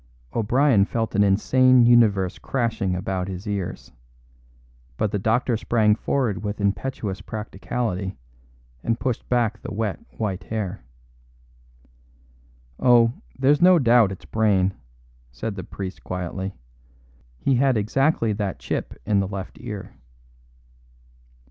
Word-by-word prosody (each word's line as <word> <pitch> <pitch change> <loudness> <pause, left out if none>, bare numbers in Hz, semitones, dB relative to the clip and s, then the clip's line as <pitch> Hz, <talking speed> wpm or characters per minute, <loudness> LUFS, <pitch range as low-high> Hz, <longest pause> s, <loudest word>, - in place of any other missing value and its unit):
O'Brien 120 0 +3
felt 115 +2 -2
an 100 - +3
insane 130 +6 +4
universe 105 -6 +4
crashing 115 -7 -1
about 90 0 -2
his 95 +1 -6
ears; 100 -3 -4 1.1
but 105 - 0
the 105 - -1
doctor 115 +4 +1
sprang 110 -1 +2
forward 115 -1 -1
with 105 0 -3
impetuous 100 0 -2
practicality 100 -2 -4 0.7
and 115 0 0
pushed 125 -4 -3
back 115 -3 +1
the 130 - -7
wet 105 -1 -2 0.2
white 100 -4 -3
hair. 105 - -4 2.0
"Oh, 120 -2 +5 0.2
there's 145 +4 +3
no 180 0 +7
doubt 120 - +4
it's 95 - -9
Brayne," 100 -4 +2 0.6
said 65 - -4
the 95 -2 -6
priest 95 +1 -7
quietly. 90 +2 -4 0.8
"He 135 - +1
had 135 -2 +3
exactly 115 +2 +1
that 100 -2 -3
chip - - -4
in 105 -2 +2
the 95 - 0
left 95 -1 -7
ear." 105 -6 -7
105 Hz, 120 wpm, -23 LUFS, 95-120 Hz, 2.0 s, no